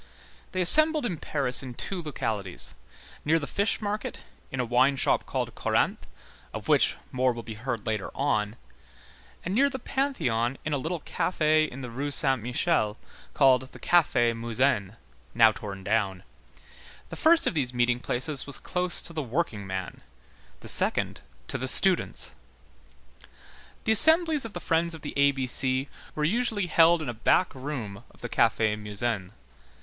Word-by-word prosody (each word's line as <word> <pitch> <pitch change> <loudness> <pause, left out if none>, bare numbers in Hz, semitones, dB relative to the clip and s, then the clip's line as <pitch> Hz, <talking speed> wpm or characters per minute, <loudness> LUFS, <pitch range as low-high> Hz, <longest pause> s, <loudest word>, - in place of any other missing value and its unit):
They 185 - -2
assembled 310 - +7
in 185 -8 -2
Paris 135 -4 -1
in 130 -2 -8
two 185 +6 -3
localities, 105 - -3 0.5
near 160 +2 +2
the 150 - -3
fish 200 +7 -1
market, 210 0 -4 0.3
in 130 - -5
a 125 - 0
wine 125 +4 +3
shop - - +1
called - - -3
Corinthe, - - -1 0.5
of - - -7
which - - +3 0.2
more 130 0 +1
will 115 0 -8
be 110 0 -7
heard 115 0 -5
later 110 -3 -2
on, 110 -6 -1 0.9
and 185 - -2
near 275 +6 +3
the 270 - -5
Pantheon 135 - -1
in 155 - -2
a 145 - 0
little 160 +3 -4
café 155 -2 +1
in 130 +2 -9
the 125 -2 -7
Rue 140 +5 -3
Saint 135 -3 +3
Michel 120 -2 0 0.4
called 130 -1 +3
the - - -12
Café 125 -9 +2
Musain, 115 -3 0 0.4
now 115 -1 +6
torn 100 -3 -8
down; 100 -3 -1 0.9
the - - -7
first 330 +1 +4
of - - +1
these 135 -6 -1
meeting 120 0 +1
places 135 +4 -2
was 140 - -3
close 180 0 0
to 170 - -8
the 160 - -2
workingman, 105 - -4 0.6
the - - -10
second - - -1 0.3
to - - -3
the 130 - -3
students. 185 +6 +3 1.5
The - - +1
assemblies 315 - +4
of 225 - -8
the 175 - -5
Friends 165 0 0
of 160 - -13
the 145 - -6
A 140 0 +4
B 135 -2 -2
C 130 +2 +2 0.3
were 150 - -2
usually 215 +3 0
held 165 -1 +4
in - - -6
a 120 - -3
back 120 +11 +1
room 125 -6 -6
of - - -20
the 120 - -5
Café 110 -2 +2
Musain. 105 -2 -3
135 Hz, 165 wpm, -26 LUFS, 115-170 Hz, 1.5 s, assembled